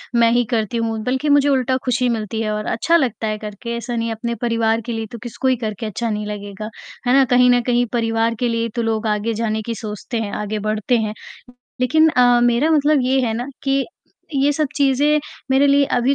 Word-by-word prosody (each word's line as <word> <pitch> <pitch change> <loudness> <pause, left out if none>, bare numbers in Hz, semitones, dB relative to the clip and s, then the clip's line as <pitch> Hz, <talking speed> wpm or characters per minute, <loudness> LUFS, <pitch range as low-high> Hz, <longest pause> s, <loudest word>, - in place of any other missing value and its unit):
मैं 230 -1 +4
ही 240 +1 +3
करती 230 -2 -1
हूँ 225 -1 -1
बल्कि 260 +5 -1
मुझे 285 0 +4
उल्टा 260 -1 +1
खुशी 250 0 +1
मिलती 220 -1 -2
है 215 -1 -1
और 210 0 -3
अच्छा 335 +9 +2
लगता 245 -7 -1
है 215 0 -2
करके, 215 +2 -6
ऐसा 240 +1 -4
नहीं, 230 0 -1
अपने 235 +1 -3
परिवार 230 -1 +1
के 240 - -4
लिए 225 -1 -3
तो 235 - -7
किसी 240 - -8
को 265 - +2
ही 260 - +4
करके 215 +1 -4
अच्छा 230 +2 -3
नहीं 210 -1 -2
लगेगा, 205 0 -6 0.4
है 245 - +4
ना? 270 0 +6
कहीं 250 0 +4
न 245 0 +4
कहीं 245 0 +2
परिवार 225 -1 +1
के 245 - +1
लिए 230 0 -1
ही 230 - -2
तो 235 - 0
लोग 225 -1 -1
आगे 210 +2 0
जाने 220 0 -1
की 230 - -3
सोचते 215 +1 -5
हैं, 210 -2 -3
आगे 210 0 -3
बढ़ते 215 +3 +1
हैं। 215 -2 -2 0.7
लेक़िन 315 +6 +4
अ, 245 -4 +4
मेरा 240 +6 +3
मतलब 300 -1 +3
ये 260 +1 +2
है 225 - -1
ना 240 +2 -3 0.2
कि 275 -1 +1 0.5
ये 275 +1 +3
सब 305 +1 0
चीज़े 285 +2 +3 0.3
मेरे 270 +2 +4
लिए 280 0 +4
अभी 250 +3 +2
235 Hz, 230 wpm, -20 LUFS, 220-260 Hz, 0.7 s, ना